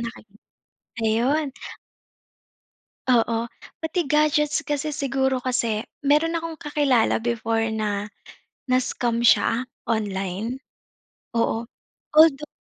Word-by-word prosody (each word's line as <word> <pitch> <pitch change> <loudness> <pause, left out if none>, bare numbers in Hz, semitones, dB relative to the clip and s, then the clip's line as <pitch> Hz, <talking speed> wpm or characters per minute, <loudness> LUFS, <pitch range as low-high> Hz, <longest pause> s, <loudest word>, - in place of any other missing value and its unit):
nakiki 220 -3 -8 0.7
ayun. 255 +7 +2 1.6
Oo, 230 -2 +3 0.5
pati 320 +3 0
gadgets, 300 0 +2
kasi 295 +1 -2
siguro 270 -2 0
kasi 230 -4 0 0.2
meron 315 +3 +4
akong 330 -1 -6
kakilala 285 -8 +1
before 225 -1 0
na 210 -2 -2 0.6
na-scam 240 -2 0
siya, 235 +1 +4 0.2
online, 210 +2 -2 0.8
oo. 230 0 +1 0.5
Although 300 -2 +5
245 Hz, 85 wpm, -24 LUFS, 225-295 Hz, 1.6 s, Although